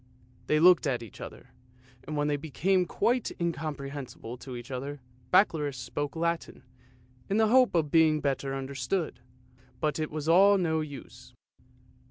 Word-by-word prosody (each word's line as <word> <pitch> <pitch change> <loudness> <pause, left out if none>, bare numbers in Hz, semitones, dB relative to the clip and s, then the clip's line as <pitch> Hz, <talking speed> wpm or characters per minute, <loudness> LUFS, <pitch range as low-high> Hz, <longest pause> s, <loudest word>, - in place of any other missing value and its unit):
They 155 - +3
looked 175 -1 +6
at 125 -3 -1
each 110 - -12
other, - - -10 0.6
and 155 0 -4
when 145 0 +1
they 150 - +1
became 175 +5 0
quite 245 0 0
incomprehensible 140 -7 -4
to 125 +1 -8
each 120 +2 -8
other, 140 +3 -5 0.3
Baccalaureus 155 -8 +3
spoke 145 +3 -4
Latin, 170 0 -2 0.7
in 200 - +1
the 220 -1 +4
hope 255 -3 +5
of 155 -4 +1
being 160 -2 +4
better 135 -1 -1
understood, 135 +5 -3 0.6
but 150 +1 -1
it 155 - -2
was 155 0 -5
all 195 +5 +6
of 195 - +1
no 160 -2 +1
use. 145 -4 -10
155 Hz, 155 wpm, -28 LUFS, 140-170 Hz, 0.7 s, looked